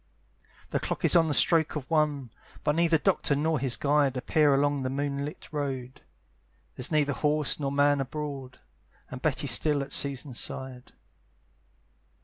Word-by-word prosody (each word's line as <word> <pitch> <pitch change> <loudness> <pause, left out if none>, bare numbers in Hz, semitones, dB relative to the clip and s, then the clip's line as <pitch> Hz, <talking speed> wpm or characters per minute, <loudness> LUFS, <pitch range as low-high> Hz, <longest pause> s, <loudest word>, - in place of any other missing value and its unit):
The - - 0
clock - - -3
is - - +3
on 165 -2 +5
the 150 - 0
stroke 160 -3 +4
of 140 -3 -5
one; 150 -6 0 0.3
But 150 0 +1
neither 165 -1 +3
Doctor 145 - 0
nor 155 +1 0
his 130 -1 0
guide 145 -2 +1
Appear 150 +3 +2
along 140 0 +1
the 130 - -2
moonlight 140 +2 -4
road, 135 -4 -5 0.7
There's 125 - -1
neither 145 -2 +2
horse 150 -1 0
nor 140 -2 -2
man 145 0 +2
abroad, 135 -2 -6 0.5
And 130 - -7
Betty's 140 -2 +2
still 145 +3 +2
at 140 - -9
Susan's 135 -2 -2
side. 130 -1 -6
145 Hz, 150 wpm, -27 LUFS, 135-150 Hz, 0.7 s, on